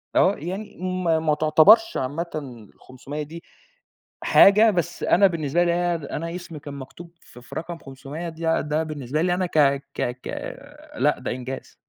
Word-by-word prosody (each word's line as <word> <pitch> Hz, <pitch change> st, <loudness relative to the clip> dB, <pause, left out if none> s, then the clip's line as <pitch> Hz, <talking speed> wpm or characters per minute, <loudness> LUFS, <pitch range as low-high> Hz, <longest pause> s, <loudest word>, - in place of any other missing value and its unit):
آه، 195 Hz, -, +4 dB
يعني 190 Hz, +7 st, -6 dB, 0.3 s
ما 165 Hz, -2 st, +2 dB
ما 155 Hz, -1 st, +1 dB
تُعتبرش 160 Hz, -, +5 dB
عامةً 140 Hz, -5 st, -5 dB
500 140 Hz, +4 st, -7 dB
دي 165 Hz, +4 st, -10 dB, 0.8 s
حاجة، 210 Hz, +3 st, +6 dB
بس 175 Hz, -2 st, -2 dB
أنا 195 Hz, +2 st, +5 dB
بالنسبة 170 Hz, -1 st, 0 dB
لي 170 Hz, -, +2 dB
ياه! 175 Hz, 0 st, +1 dB
ده 145 Hz, -4 st, -9 dB
أنا 165 Hz, +2 st, -4 dB
اسمي 170 Hz, -3 st, -8 dB
كان 145 Hz, 0 st, -9 dB
مكتوب 140 Hz, +5 st, -10 dB
ف 125 Hz, -, -15 dB
في 125 Hz, +1 st, -12 dB
رقم 170 Hz, +1 st, -5 dB
500 140 Hz, +4 st, -8 dB
دي 165 Hz, 0 st, -12 dB, 0.2 s
ده 150 Hz, +2 st, -1 dB
بالنسبة 150 Hz, -2 st, -3 dB
لي 175 Hz, +1 st, +2 dB
أنا 185 Hz, +1 st, 0 dB
ك 170 Hz, -, -4 dB, 0.4 s
ك -, -, -5 dB, 0.2 s
ك -, -, -7 dB, 0.7 s
لأ 150 Hz, -, +2 dB
ده -, -, -4 dB
إنجاز. 130 Hz, +1 st, -6 dB
160 Hz, 170 wpm, -23 LUFS, 145-175 Hz, 0.8 s, حاجة